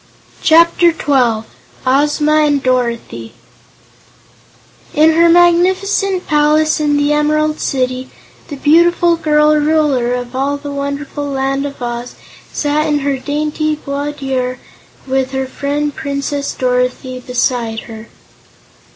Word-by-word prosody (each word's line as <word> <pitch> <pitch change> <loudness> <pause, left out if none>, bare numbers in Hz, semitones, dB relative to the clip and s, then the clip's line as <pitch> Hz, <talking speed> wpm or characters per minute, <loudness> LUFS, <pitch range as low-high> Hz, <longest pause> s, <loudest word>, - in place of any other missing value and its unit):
Chapter 335 +2 +4
Twelve 250 -8 0 0.4
Ozma 295 +3 +2
and 290 -3 +2
Dorothy 235 - -2 1.6
In 310 +2 +5
her 335 +1 +4
magnificent 370 +3 +2
palace 305 +1 +2
in 295 -1 +1
the 290 +1 +1
Emerald 305 +1 +1
City, 255 -1 -2 0.4
the 290 - -7
beautiful 340 +4 +3
girl 300 -1 +2
Ruler 295 -5 +1
of 245 0 -6
all 280 +2 -1
the 285 0 -7
wonderful 280 +1 -4
Land 275 0 -1
of 280 - -10
Oz 240 0 -5 0.4
sat 295 +1 0
in 295 -1 +1
her 275 -1 -1
dainty 305 +2 -2
boudoir 280 -3 -3 0.5
with 265 0 -1
her 265 0 -1
friend 285 +2 -3
Princess 280 -1 -3
Dorothy 250 0 -1
beside 245 -2 -2
her. 220 -1 -11
285 Hz, 115 wpm, -15 LUFS, 255-305 Hz, 1.6 s, In